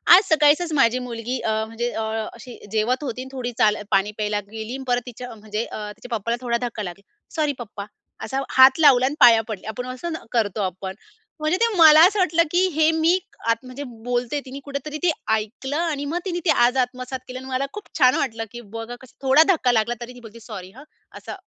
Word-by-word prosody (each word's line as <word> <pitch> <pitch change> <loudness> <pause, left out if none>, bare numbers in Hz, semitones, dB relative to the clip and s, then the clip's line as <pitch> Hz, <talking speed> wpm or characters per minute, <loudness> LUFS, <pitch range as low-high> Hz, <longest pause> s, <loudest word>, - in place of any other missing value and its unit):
आज 390 - +6
सकाळीसच 310 +2 +4
माझी 255 -3 +3
मुलगी 245 0 -4
अ, - - -2 0.2
म्हणजे 230 +2 -4
अशी, 225 +3 -5
जेवत 230 +6 0
होती 255 -3 -4
आणि 260 - -8
थोडी 250 -2 -4
चाल 210 -1 +4 0.2
पाणी 195 +2 +2
प्यायला 210 -1 -1
गेली 220 +2 -6
आणि 265 - -6
परत 245 0 +1
तिच्या 245 0 -8
म्हणजे 215 +1 -4
अ, 210 -1 -7
तिच्या 245 -1 -5
पप्पाला 230 +3 -2
थोडा 235 -2 0
धक्का 220 -2 -6
लागला. 180 0 -7 0.3
सॉरी 300 -2 +1
पप्पा 210 -3 -7 0.4
असा 270 - -2
हात 260 +2 +6
लावला 270 -5 +6
आणि 275 +3 -1
पाया 230 -2 +7
पडली. 215 -4 -6
आपण 245 +3 -5
असं 255 +7 -5
ना 320 - -5
करतो 215 -3 0
आपण, 190 0 -4 0.4
म्हणजे 310 +4 +1
ते 465 - +5
मला 315 -2 +8
असं 415 +2 -2
वाटलं, 335 -2 +3
की 360 +2 +3
हे 310 0 +4
मी 325 +3 +3 0.3
आत 230 - +4
म्हणजे 255 +3 -7 0.2
बोलते 245 +3 -1
तिने 270 +2 -8
कुठेतरी 285 +2 -5
ते 350 - +4 0.2
ऐकलं 245 +7 -4
आणि 315 -4 -1
मग 325 +5 -2
तिनी 350 -2 -2
ते 330 - +2 0.2
आज 250 +2 +1
आत्मसात 255 +1 -2
केलं. 255 0 -7
आणि 260 - -10
मला 260 +1 -1
खूप 420 - -8
छान 255 -1 +5
वाटलं, 225 -4 -2
की 240 0 -8
बघा 225 +1 -6
कसं 260 -2 -17
थोडा 275 +4 +7
धक्का 260 -7 +1
लागला, 230 0 +1
तरी 240 +1 -7
ती - - -12
बोलते 230 -1 -13
सॉरी 185 -4 -9
हं, 270 - -12 0.3
असं - - -8
250 Hz, 215 wpm, -22 LUFS, 225-290 Hz, 0.4 s, मला